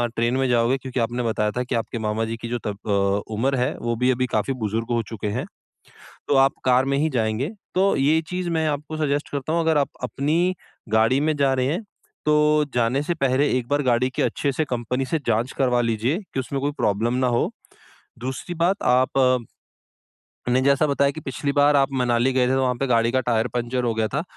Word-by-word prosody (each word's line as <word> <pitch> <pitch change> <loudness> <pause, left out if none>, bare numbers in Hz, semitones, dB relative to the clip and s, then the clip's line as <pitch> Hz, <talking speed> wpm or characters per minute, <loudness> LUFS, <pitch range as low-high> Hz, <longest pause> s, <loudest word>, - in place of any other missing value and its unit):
Train 120 +3 +1
में 135 -1 +1
जाओगे 120 +2 +2
क्योंकि 130 -1 -5
आपने 120 +1 -1
बताया 105 -2 0
था 125 - +1
कि 125 0 -3
आपके 115 0 -3
मामा 110 +1 -1
जी 115 +1 -4
की 115 - -7
जो 120 - -1
तब 100 -1 -3
अ, 100 0 +1
उम्र 130 +6 +1
है 125 0 0
वो 120 0 -1
भी 125 +3 +1
अभी 130 0 0
काफ़ी 110 +3 -1
बुज़ुर्ग 110 +2 -2
हो 120 -1 +2
चुके 110 -2 -5
हैं। 105 - -2 0.8
तो 145 - +2
आप 135 +1 +5
कार 130 +1 +4
में 140 0 0
ही 155 +2 +1
जाएँगे, 115 +3 -1 0.3
तो 195 +2 +3
ये 150 +4 +3
चीज़ 180 -1 -3
मैं 160 -1 0
आपको 150 +1 -3
सजेस्ट 145 -1 -1
करता 145 +2 -3
हूँ 170 - +2
अगर 160 -1 +2
आप 140 - +1
अपनी 160 +8 0 0.3
गाड़ी 110 +5 +3
में 155 +1 +1
जा 140 -1 +3
रहे 130 -1 0
हैं, 170 +10 -2 0.4
तो 150 0 +3
जाने 125 +3 +1
से 175 - -1
पहले 135 -2 +1
एक 120 -2 -4
बार 145 +2 +1
गाड़ी 125 0 +2
की - - 0
अच्छे 140 - 0
से 155 +4 -1
कंपनी 125 0 -2
से 160 +4 -1
जाँच 115 +3 +1
करवा 125 -2 +2
लीजिए, 115 +6 0 0.2
कि - - -1
उसमें 135 +1 -3
कोई 145 +1 0
प्रॉब्लम 115 -3 0
ना 130 0 +1
हो। 120 -1 +1 0.7
दूसरी 130 +7 -5
बात 175 +4 +1
आप 130 -1 +3 1.1
ने 130 +1 +3
जैसा 140 +2 +3
बताया 140 0 +2
कि 155 - -8
पिछली 140 +1 -3
बार 145 0 +4
आप 135 -1 +3
मनाली 125 0 +2
गए 125 -1 +2
थे, - - +1
तो 135 - +2
वहाँ 125 -1 +1
पे 135 +3 -2
गाड़ी 115 -1 +2
का 130 - +2
टायर 115 -1 +1
पंक्चर 120 +1 -1
हो 120 -2 0
गया 110 -1 +1
था। 150 +8 -2
130 Hz, 225 wpm, -23 LUFS, 120-145 Hz, 1.1 s, आप